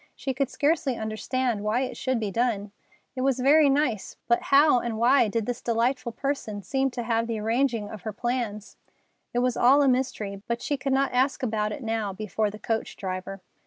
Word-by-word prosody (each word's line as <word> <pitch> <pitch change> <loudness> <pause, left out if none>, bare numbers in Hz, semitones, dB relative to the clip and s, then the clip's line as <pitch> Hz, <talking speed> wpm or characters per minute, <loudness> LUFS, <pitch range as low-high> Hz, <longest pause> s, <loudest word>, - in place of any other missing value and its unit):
She 265 - -3
could 270 0 -1
scarcely 290 -2 +1
understand 220 +1 -2
why 215 +4 0
it 260 - -3
should 260 -2 -1
be 210 -3 -2
done. 210 -2 -1 0.4
It 255 - -3
was 265 -1 +1
very 285 +3 +5
nice, 270 -7 0
but 235 0 +3
how 280 -2 +5
and 235 -2 -3
why 240 +1 +4
did 225 +1 -1
this 245 +1 -3
delightful 240 +2 0
person 230 -5 -3
seem 270 +3 0
to 240 -1 -5
have 230 0 0
had 230 0 0
the 225 -2 -2
arranging 230 0 0
of 210 -1 -9
her 215 - -4
plans? 230 -2 -3 0.5
It 240 - 0
was 250 - 0
all 275 +4 +5
a - - +3
mystery, 220 -6 -1
but 235 0 -1
she 290 - -1
could 275 0 -3
not 270 0 +1
ask 260 +2 +1
about 215 -3 0
it 250 - -6
now 220 -3 -2
before 215 +1 -1
the 210 - -9
coach 225 +1 -3
driver. 185 0 -5
235 Hz, 205 wpm, -26 LUFS, 215-265 Hz, 0.5 s, very